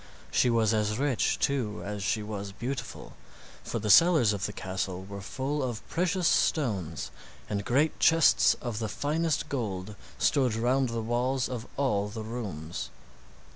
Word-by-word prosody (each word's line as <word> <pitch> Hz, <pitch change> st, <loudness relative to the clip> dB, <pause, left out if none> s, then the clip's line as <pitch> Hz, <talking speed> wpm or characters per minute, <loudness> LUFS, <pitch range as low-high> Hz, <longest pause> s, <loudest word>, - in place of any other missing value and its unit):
She 125 Hz, -, +3 dB
was 115 Hz, -2 st, +3 dB
as 105 Hz, 0 st, 0 dB
rich, 135 Hz, -4 st, +1 dB
too, 125 Hz, -7 st, -1 dB
as 105 Hz, 0 st, -4 dB
she 105 Hz, +2 st, 0 dB
was 100 Hz, -2 st, -5 dB
beautiful, 125 Hz, +5 st, -5 dB, 0.5 s
for -, -, -3 dB
the 105 Hz, -1 st, +1 dB
cellars 155 Hz, -, +6 dB
of 100 Hz, -1 st, -2 dB
the -, -, -5 dB
castle 95 Hz, -1 st, -4 dB
were 100 Hz, 0 st, -7 dB
full 135 Hz, +8 st, -3 dB
of 120 Hz, -4 st, -4 dB
precious 180 Hz, +1 st, +1 dB
stones, 95 Hz, -, 0 dB, 0.4 s
and 100 Hz, -1 st, -2 dB
great 140 Hz, +8 st, +1 dB
chests 165 Hz, -1 st, +5 dB
of 120 Hz, -3 st, -3 dB
the 110 Hz, -2 st, -2 dB
finest 155 Hz, +6 st, -1 dB
gold 105 Hz, -7 st, -4 dB, 0.2 s
stood 130 Hz, -6 st, +2 dB
round 125 Hz, +3 st, +1 dB
the 115 Hz, -1 st, -3 dB
walls 125 Hz, +3 st, 0 dB
of 125 Hz, -2 st, -5 dB
all 105 Hz, -8 st, +1 dB
the 110 Hz, +1 st, -6 dB
rooms. 100 Hz, -9 st, -5 dB
115 Hz, 155 wpm, -28 LUFS, 105-135 Hz, 0.5 s, cellars